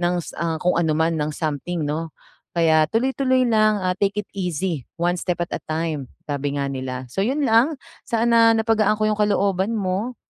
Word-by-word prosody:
ng 175 0 +1
s - - -9
ah, 165 -1 0
kung 180 +3 +1
ano 155 -2 +1
man 160 -1 +1
ng 150 +1 -1
something, 155 +2 -2
'no? 155 +2 -4 0.4
Kaya 160 -2 +4
tuloy-tuloy 260 - +1
lang, 215 -3 +3
ah, 185 0 +1
"Take 205 +1 0
it - - -48
easy, 175 - -3
one 175 +1 0
step 175 -1 -2
at - - -22
a - - -2
time." 155 -4 -2 0.2
Sabi 145 -1 -3
nga 140 -1 -1
nila. 130 -1 -4
So, 195 - -2
yun 275 +8 0
lang 245 +6 +3 0.3
sana 230 -1 +4
na 220 - 0
napagaan 215 -2 +2
ko 215 - 0
yung 215 0 +1
kalooban 200 0 +1
mo. 200 +5 -2
185 Hz, 200 wpm, -22 LUFS, 160-220 Hz, 0.4 s, Kaya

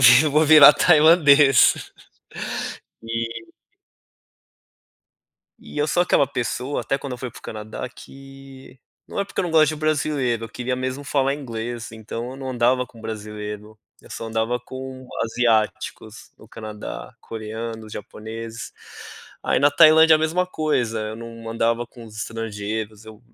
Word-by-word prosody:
vi 125 +4 +8
vou 150 +2 +3
virar 150 -1 +9
tailandês." 150 -5 +6 1.3
E 115 0 -4 2.1
E - - -12
eu 150 +1 +1
sou 175 - +3
aquela 145 - +3
pessoa, 130 +1 -3
até 135 - -1
quando 140 -2 -7
eu - - -10
fui 125 0 -5
pro - - -13
Canadá 110 +2 -6
que, 135 +1 -14 0.3
não - - -6
é 200 - +1
porque - - -4
eu - - 0
não 175 - -3
gosto 155 -2 +5
de 155 - -5
brasileiro, 145 -6 0
eu 115 - -8
queria 125 +2 -3
mesmo 130 +2 -3
falar 140 -1 +1
inglês 120 -4 -6
então 115 +2 -6
eu 130 - -9
não 135 -1 -5
andava 125 +1 +2
com 115 - -17
brasileiro, 105 -1 -7 0.2
eu - - -17
só 115 - -6
andava 115 +2 -1
com 130 +1 -8 0.2
asiáticos 110 -1 -1
no 110 - -16
Canadá, 105 - -8
coreanos, 110 0 -7
japoneses, 115 +3 -8 0.7
aí - - +1
na 145 - +5
Tailândia 160 +2 +7
a - - +3
mesma 165 +4 0
coisa, 130 -10 -1
eu 110 0 -5
não 115 0 -9
andava 115 +1 0
com 120 -1 -13
os 110 -1 -13
estrangeiros, 110 -1 -5
eu 110 -1 -13
120 Hz, 150 wpm, -22 LUFS, 110-140 Hz, 2.1 s, virar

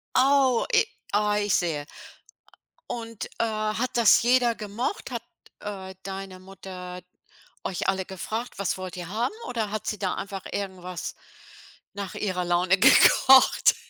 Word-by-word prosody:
Oh, 265 -2 +4
e 460 0 +6 0.3
ah, 210 0 +2
ich 205 -1 0
sehe, 155 -5 -1 1.0
und, 230 -2 -5
äh, - - +3
hat 215 +2 -1
das 230 -3 +6
jeder 240 -1 +3
gemocht? 220 - -4
Hat, - - -4 0.4
äh, 190 -2 -7
deine 195 -1 -7
Mutter 185 -1 -9 0.6
euch 185 -1 -3
alle 190 0 +1
gefragt: 215 +6 -5
„Was 200 -5 -1
wollt 185 -1 -6
ihr 175 -2 -6
haben“, 225 - -1
oder 225 -4 -2
hat 215 0 -4
sie 210 - -2
da 185 -1 -1
einfach 195 -1 -6
irgendwas 185 -3 -5 0.8
nach 200 -3 -6
ihrer 185 -3 -2
Laune 175 +2 +2
gekocht? 260 +5 +6
200 Hz, 140 wpm, -26 LUFS, 185-225 Hz, 1.0 s, e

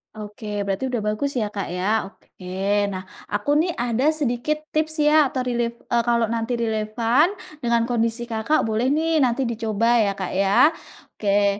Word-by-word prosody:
Oke, 210 -1 -5
berarti 200 +7 -1
udah 245 -3 -2
bagus 215 +7 -1
ya, 215 -4 -1
Kak, 200 -2 -4
ya. 195 +4 0
Oke. 195 +2 -3
Nah, 185 -2 -5 0.2
aku 205 +7 -3
nih 340 +1 +1
ada 240 +3 0
sedikit 300 +2 -1
tips 310 0 0
ya 300 -1 +5
atau 255 -1 -3
relef 240 -1 -1 0.2
eee, 235 -1 +3
kalau 235 -1 +3
nanti 230 +1 -1
relevan 230 +5 +1 0.3
dengan 235 -2 +1
kondisi 230 0 -1
Kakak 230 +5 0
boleh 225 +3 0
nih 315 +3 +2
nanti 260 -1 +2
dicoba 230 0 +1
ya, 205 -2 +2
Kak, 190 -2 -4
ya. 195 - +4 0.4
Oke. 200 -1 +1
230 Hz, 165 wpm, -23 LUFS, 210-255 Hz, 0.4 s, ya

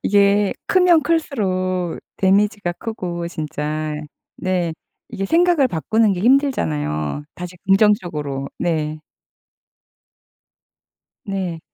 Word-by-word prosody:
이게 200 0 +3
크면 360 -4 +5
클수록 185 - -1 0.2
데미지가 200 -1 +2
크고 180 -7 -4
진짜 155 -1 -3 0.4
네. 180 -3 -1 0.4
이게 195 - -4
생각을 335 - +4
바꾸는 215 +4 +2
게 180 - -3
힘들잖아요. 80 - +1
다시 180 0 -8
긍정적으로. 175 -9 +2
네. 155 -2 -1 2.2
네. 190 -5 -3
185 Hz, 200 characters per minute, -20 LUFS, 160-210 Hz, 2.2 s, 크면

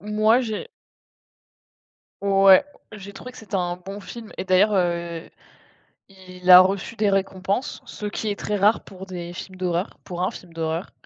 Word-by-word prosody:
moi, 215 +4 +3
j'ai 225 - -4 1.5
ouais, 195 +3 +6 0.3
j'ai 200 -1 -9
trouvé 250 - -10
que - - -14
c'était 210 -3 -9
un 175 -1 -1
bon 195 +3 -9
film 225 +2 -10
et - - -3
d'ailleurs, 195 +3 +3
heu, 170 -2 -1 0.8
il 185 -1 -5
a 180 0 +12
reçu 195 +4 0
des 210 -1 +2
récompenses, 195 +4 -1
ce 210 - -7
qui 215 +1 -3
est 205 - -3
très 210 - -2
rare 205 +3 +3
pour 190 0 -11
des 175 -2 -7
films 185 +1 -9
d'horreur, 180 +1 -2
pour 180 -1 -5
un 185 - +1
film 175 -2 -12
d'horreur. 165 +2 -3
190 Hz, 170 wpm, -23 LUFS, 180-210 Hz, 1.5 s, a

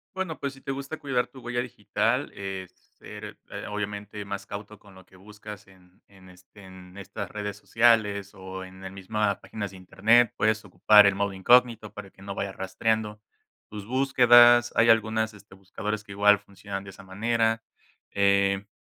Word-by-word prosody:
Bueno, 185 -4 -4
pues, 140 0 -3
si 135 - -16
te 135 - -4
gusta 140 +3 -6
cuidar 130 -4 -1
tu 130 - -15
huella 120 0 -3
digital, 125 -1 -1
es 95 -2 -6 0.3
ser, - - -10
eh, - - -7
obviamente 105 0 -5
más 100 0 -6
cauto 105 +1 -8
con 100 -2 -18
lo 95 - -16
que - - -24
buscas 105 +1 -12
en 90 0 -23
en, 95 -2 -18
este, 90 +3 -18
en 95 0 -13
estas 100 0 -7
redes 105 -1 -5
sociales 105 -3 +2
o 95 0 -8
en 95 0 -13
el 95 - -7
misma 100 +1 -2
páginas 105 -3 -6
de 95 - -13
Internet, 110 +5 +3
puedes 110 0 +1
ocupar 105 -1 +6
el 100 - +3
modo 100 0 -1
incógnito 115 +2 +3
para 105 -2 -9
que 95 - -19
no 100 0 -6
vaya 100 0 -3
rastreando 105 +3 -2 0.5
tus 105 -1 -8
búsquedas. 120 -2 +6
Hay 115 0 +4
algunas 110 0 +2
este 100 -2 -16
buscadores 105 +2 -5
que 100 -1 -12
igual 105 0 +4
funcionan 100 0 -8
de 100 - -10
esa 95 +1 -14
manera, 115 +3 0 0.5
eh, 100 0 +2
105 Hz, 180 wpm, -26 LUFS, 95-115 Hz, 0.5 s, ocupar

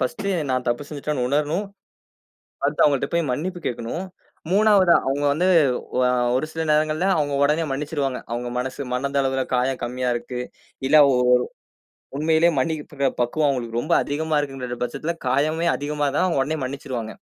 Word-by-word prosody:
First 160 +11 -2 0.3
நான் 130 -1 -1
தப்பு 120 +4 0
செஞ்சுட்டேன்னு 145 -3 -2
உணரணும். 150 +8 0 1.0
அடுத்து 145 +1 +2
அவுங்கட்ட 140 -3 +2
போய் 165 -6 +1
மன்னிப்பு 175 +6 -3
கேட்கணும். 120 +10 -4 0.5
3வதா 200 -3 +5
அவுங்க 140 +2 0
வந்து 175 +5 +1 0.6
ஆ - - +3 0.3
ஒரு 155 - -1
சில 160 - -3
நேரங்கள்ல 155 +3 +2
அவுங்க 145 -2 0
உடனே 150 +3 +2
மன்னிச்சிடுவாங்க. 140 -2 -2
அவுங்க 120 +1 -3
மனசு 130 +2 -3
மனதளவில 135 0 0
காயம் 125 +1 +1
கம்மியா 125 +1 -2
இருக்கு, 125 +1 -5 0.5
இல்ல 155 +3 +5
ஓ - - +3 1.1
உண்மையிலே 160 +2 +3
மன்னிப்பு 145 -2 -1
பக்குவம் 145 +5 +1
அவுங்களுக்கு 120 -3 -2
ரொம்ப 165 +6 0
அதிகமா 155 +1 -1
இருக்குற 130 -4 -5
பட்சத்துல, 140 +7 -3
காயமே 155 +6 +1
அதிகமா 145 0 -2
தான் - - +3
அவுங்க 165 -7 +1
உடனே 155 +2 -3
மன்னிச்சிருவாங்க. 130 -4 -5
145 Hz, 145 wpm, -23 LUFS, 130-155 Hz, 1.1 s, 3வதா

